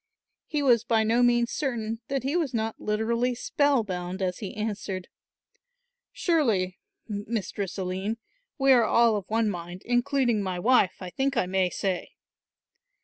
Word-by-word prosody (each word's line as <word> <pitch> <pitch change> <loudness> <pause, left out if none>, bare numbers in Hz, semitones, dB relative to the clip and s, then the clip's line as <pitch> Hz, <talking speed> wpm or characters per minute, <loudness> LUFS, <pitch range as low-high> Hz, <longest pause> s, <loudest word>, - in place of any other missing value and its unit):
He 300 -2 -1
was 240 -4 +4
by 230 -2 +2
no 230 +3 +2
means 240 -1 +3
certain 230 -5 -2
that 275 -2 -2
he 275 +5 -1
was 310 -8 0
not 220 0 -2
literally 230 +3 0
spell 280 0 +2
bound 180 -1 -4
as 185 -2 -2
he 200 - -6
answered; 205 -3 -4 1.0
"Surely, 220 - +1 0.3
Mistress 205 -2 -4
Aline, 190 +4 -2 0.4
we 270 -2 +4
are 245 -3 +6
all 230 0 +4
of 200 -2 -4
one 225 0 +2
mind, 175 -2 -5
including 245 -2 +2
my 185 -2 -2
wife, 205 -1 +3
I 180 - -6
think 270 +3 -1
I 210 - +3
may 185 0 +1
say." 185 -1 -3
220 Hz, 150 wpm, -27 LUFS, 190-245 Hz, 1.0 s, are